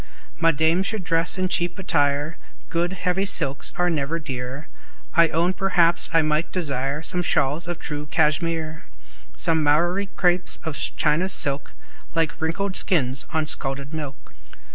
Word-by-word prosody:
My 165 0 +4
dame 160 +4 +1
should 200 0 -2
dress 165 +2 +2
in 185 0 0
cheap 175 0 -1
attire; 150 -3 0 0.3
(Good, 170 +2 -1
heavy 185 0 -1
silks 140 -8 +2
are 180 - 0
never 160 -1 -1
dear;) 135 -2 -6 0.5
I 170 -1 +5
own 170 +4 0
perhaps 175 -3 +2
I 165 -1 +3
might 155 +2 -1
desire 140 -3 -2
Some 180 +1 0
shawls 160 0 0
of 175 -1 -4
true 150 0 -6
Cashmere, 160 +1 -1 0.5
Some 160 -1 +1
marrowy 175 +7 +1
crapes 180 -1 +4
of 160 -3 -4 0.2
China 165 +5 +1
silk, 140 -6 +3 0.4
Like 165 -1 -1
wrinkled 185 +4 -2
skins 135 -7 +1
on 160 -2 -1
scalded 140 0 -1
milk. 150 -3 -8
165 Hz, 145 wpm, -22 LUFS, 150-175 Hz, 0.5 s, I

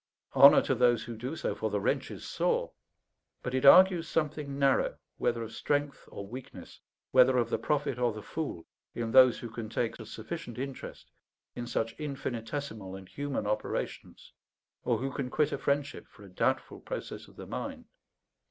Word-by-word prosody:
Honour 140 +1 +9
to - - +1
those 120 -2 +3
who 120 -1 -7
do 125 +7 -5
so, - - -2
for 110 - -2
the 105 - -1
wrench - - 0
is - - -8
sore. - - 0 0.7
But 125 - -3
it 130 +1 +1
argues 180 +2 +8
something 150 -3 -2
narrow, 140 -1 +2 0.2
whether 115 -1 0
of 115 - -7
strength 145 +2 -2
or 100 - -7
weakness, 125 +5 -10 0.3
whether 130 0 +6
of 120 -1 +1
the - - 0
prophet 145 -4 -1
or 120 -1 +2
the 105 -1 -8
fool, 145 - -5 0.3
in 115 -1 -2
those 130 -1 +7
who 120 - -7
can 115 -1 -6
take 115 +1 -2
a 110 - -8
sufficient 120 +1 -7
interest 135 +1 -7 0.4
in 120 0 -5
such 115 -1 -1
infinitesimal 120 -7 -4
and 95 -1 -11
human 140 -6 -3
operations, 105 +1 -4 0.5
or - - +1
who 135 +1 -3
can 130 -2 -3
quit 150 +3 +1
a - - -3
friendship 140 0 -1
for 105 - -17
a 100 - -12
doubtful 90 - -1
process - - -6
of - - -18
the - - -9
mind. - - -6
125 Hz, 180 wpm, -30 LUFS, 115-140 Hz, 0.7 s, Honour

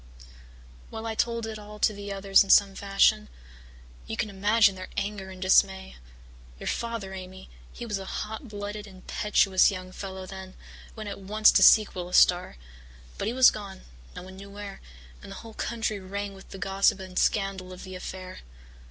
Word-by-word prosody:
"Well, 225 0 -7
I 225 - -2
told 230 +1 -1
it 220 -1 -6
all 210 0 -11
to 210 - +2
the 200 0 -7
others 195 0 +4
in 195 - -12
some 200 -1 +6
fashion. 200 +2 +2 0.8
You - - -5
can 210 - -2
imagine 205 +1 +4
their 185 -1 -9
anger 200 -1 -3
and 185 -1 -10
dismay. 190 0 +2 0.6
Your - - -8
father, 230 -5 -3
Amy 190 0 -10 0.2
he 240 - -8
was 210 -4 -3
a 190 - -7
hot 220 +6 -5
blooded, 205 0 -6
impetuous, 190 0 +2
young 185 -2 -6
fellow 190 0 -7
then 190 0 -9 0.4
went 215 -2 -7
at 200 - -7
once 210 +2 +4
to - - +4
seek 215 -2 +7
Willis 180 0 -1
Starr. 175 - +4 0.6
But - - -2
he 225 - -1
was 260 -1 +7
gone, 200 -3 -8 0.3
no - - -7
one 190 +1 -12
knew 200 +1 -10
where, 200 -1 -9 0.4
and 200 - -11
the - - -7
whole 225 - -10
country 225 -2 -3
rang 200 +1 -5
with 195 0 -15
the - - -9
gossip 195 +1 +2
and 185 -1 -9
scandal 195 -3 0
of 185 - -10
the 185 - -9
affair. 185 0 -7
195 Hz, 185 wpm, -27 LUFS, 190-210 Hz, 0.8 s, seek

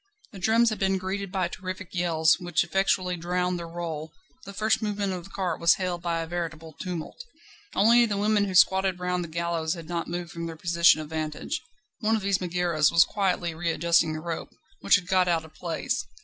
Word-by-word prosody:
The 195 - -10
drums 225 +4 +3
had 215 - -4
been 190 0 +1
greeted 190 +1 -4
by 185 -3 0
terrific 185 +1 -7
yells, 165 -2 +2
which 175 0 +1
effectually 185 0 +1
drowned 180 +1 -1
their 170 - -6
roll; 165 -2 -5 0.3
the 200 - -7
first 215 +3 +1
movement 205 -2 -1
of 180 -2 -6
the - - -13
cart 185 -4 -2
was 170 0 +5
hailed 180 -2 -3
by 170 -1 -1
a - - -3
veritable 165 -2 -5
tumult. 175 - -6 0.5
Only 235 +4 +5
the 205 -2 -2
women 210 0 +2
who 190 -2 -4
squatted 190 0 +4
round 180 0 -1
the - - -6
gallows 170 0 -2
had 165 -2 -9
not 170 -1 -3
moved 175 0 -5
from 170 0 -5
their 165 - -6
position 170 -1 +4
of 150 - -8
vantage; 155 - -3 0.4
one 225 -1 +2
of 215 - -2
these 195 -1 +1
Mægæras 175 -3 +1
was 170 0 +6
quietly 180 -4 -1
readjusting 165 -1 +2
the 155 - -5
rope, 165 0 -5 0.3
which - - +5
had 185 - 0
got 185 -1 +3
out 165 -2 +1
of 160 - -16
place. 170 -2 -2
175 Hz, 205 wpm, -26 LUFS, 165-190 Hz, 0.5 s, was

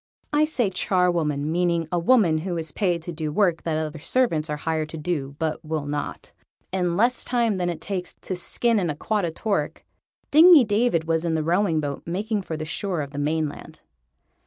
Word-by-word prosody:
(I 300 +1 +4
say 245 -10 0
charwoman, 170 -6 0
meaning 170 -1 +1
a 175 - +1
woman 175 -5 +4
who 175 +1 -3
is 160 -2 -2
paid 175 -4 0
to 175 - -5
do 155 -2 -4
work 175 -1 +2
that 160 -2 -1
other 155 0 -4
servants 165 - +1
are 150 - -2
hired 155 0 -2
to 160 - -7
do, 150 -4 -3
but 160 0 -2
will 155 -2 -3
not.) 145 0 -5 0.4
In 180 -2 0
less 240 +4 +2
time 235 -5 +1
than 175 -1 -1
it 165 -2 -5
takes 185 -2 -4
to 185 - -5
skin 230 +5 +1
an 175 -4 -1
acquadatoric, 195 +5 -2 0.5
Dingy 320 -1 +8
David 210 -5 +1
was 160 0 0
in 165 -2 0
the 155 - 0
rowing 170 0 +1
boat 145 -2 -3
making 205 +4 -1
for 165 -4 -5
the 155 - -4
shore 180 +1 -2
of 140 -1 -6
the 145 - -5
mainland. 150 0 -3
170 Hz, 190 wpm, -24 LUFS, 155-200 Hz, 0.5 s, Dingy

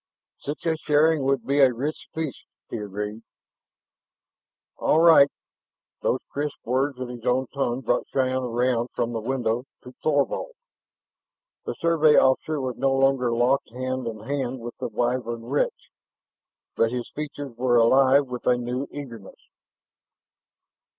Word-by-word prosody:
"Such 145 +4 -6
a 165 -1 +2
sharing 155 0 +2
would 135 -2 +1
be 140 +1 +1
a 135 -2 +6
rich 140 +6 -4
feast," 160 -5 -5 0.2
he - - -3
agreed. 105 +1 -5 1.6
"All 155 - +3
right!" 160 -4 +7 0.7
Those - - 0
crisp 145 0 -3
words 130 +3 0
in 125 -1 -5
his 120 -2 -8
own 130 +1 +1
tongue 130 -2 -1
brought - - 0
Shann 130 -1 0
away 125 0 0 0.2
from 120 0 -1
the 115 - -2
window 120 0 -1 0.2
to 125 - -11
Thorvald. 150 - 0 1.1
The - - -4
Survey 160 -2 +4
officer 145 +3 +3
was 130 -2 -3
no 135 +1 +1
longer 135 -2 +2
locked 125 +4 +1
hand 130 0 -3
to 110 -2 -5
hand 130 0 -3
with 120 +1 -7
the - - -2
Wyvern 120 -1 -2
witch, 135 +5 -2 0.8
but 115 0 +2
his 125 -1 -3
features 145 -3 -6
were 120 0 +2
alive 135 +4 +5
with 125 -1 -7
a 125 - +4
new 125 +3 -3
eagerness. 120 -9 -10
130 Hz, 145 wpm, -25 LUFS, 120-140 Hz, 1.6 s, right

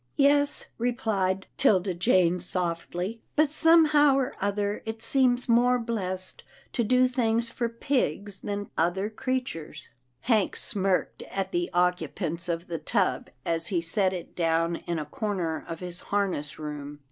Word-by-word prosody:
Yes," 285 +1 +3
replied 210 -6 0
'Tilda 190 -8 +3
Jane, 180 -1 +3
softly, 180 +4 -2
" - - -45
but 300 -1 +3
some 325 +1 +6
how 295 -2 +4
or 270 -1 -1
other, 205 +1 -1
it 220 0 -5
seems 245 +1 +3
more 245 +1 +4
blessed 190 -6 -4 0.3
to 240 - +1
do 255 +3 +4
things 235 -2 0
for 235 0 -2
pigs 225 - -1
than 205 0 -5
other 190 +6 0
creatures." 250 -9 -4 0.3
Hank 220 -5 +1
smirked 195 -3 -1
at 195 -1 -3
the 350 0 -1
occupants 175 -1 0
of 170 0 -2
the 170 -2 -4
tub 155 - 0 0.2
as 165 0 0
he 180 - 0
set 185 +3 +1
it 180 -2 -7
down 165 0 +1
in 170 - -1
a 155 - -3
corner 175 -2 -3
of 165 +1 -6
his 175 -1 -4
harness 190 -8 -1
room. 150 -1 -6
200 Hz, 150 wpm, -27 LUFS, 175-245 Hz, 0.3 s, some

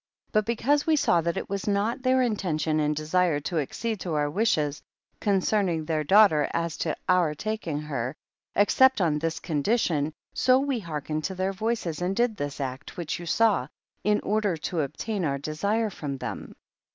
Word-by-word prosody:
16. - - -37
But 215 -1 +2
because 285 +6 +1
we 320 - +5
saw 175 - +3
that 170 +1 -2
it - - -3
was 200 +1 -4
not 210 +5 0
their 255 0 +3
intention 165 -9 0
and 150 0 +1
desire 155 +1 +1
to 160 +3 -1
accede 215 - -3
to 175 -4 -3
our 145 -1 0
wishes 155 -8 +1 0.4
concerning 195 -5 +1
their 155 -1 0
daughter 175 -3 +5
as 170 -1 -1
to 160 - -2
our 175 -4 +3
taking 215 -5 -3
her, 135 -3 -3 0.4
except 260 +5 +5
on 160 -5 +2
this 165 -1 -2
condition, 155 -1 0 0.2
so 255 0 +4
we 270 -2 0
hearkened 155 -4 -4
to 190 - -3
their 190 +1 -1
voices 195 -6 -2
and 180 +2 0
did 235 -1 +1
this 145 -6 -4
act 130 -1 -5
which 170 -1 -3
you 175 - -8
saw, 205 - +3 0.4
in 210 +1 +3
order 205 -4 0
to 160 +1 -2
obtain 195 - -3
our 140 -3 0
desire 200 +10 -1
from 145 -6 -5
them. - - -6
175 Hz, 180 wpm, -26 LUFS, 155-215 Hz, 0.4 s, we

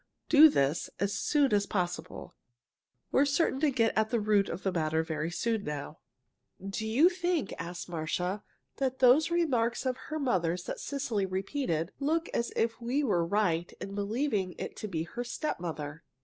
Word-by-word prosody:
Do 310 0 +9
this 140 - +1
as 200 +2 0
soon 285 -5 +2
as 205 -1 +2
possible. 180 -3 -3 0.8
We're 275 - +4
certain 285 -2 +1
to 305 0 +3
get 230 -4 +1
at 220 0 +2
the 235 - +1
root 210 -2 +2
of 175 - -5
the 190 - +1
matter 160 -2 0
very 160 0 -3
soon 220 +4 -1
now." 150 -1 -5 0.6
"Do 195 +3 -4
you 260 +10 +5
think," 350 - -1
asked 175 +1 -6
Marcia, 180 +4 -2 0.3
"that 260 -1 -1
those 265 +6 +5
remarks 265 -9 +1
of 255 -1 0
her 310 - -2
mother's 180 - 0
that - - -5
Cecily 255 -9 -2
repeated 185 - -2
look 320 +4 0
as 235 - -1
if 225 +1 0
we 255 +5 0
were 190 -10 +2
right 175 -2 0
in 195 - -6
believing 205 -2 -1
it - - -5
to 215 - -4
be 165 -5 -2
her 240 +8 -5
stepmother?" 165 - -4
215 Hz, 170 wpm, -30 LUFS, 175-270 Hz, 0.8 s, Do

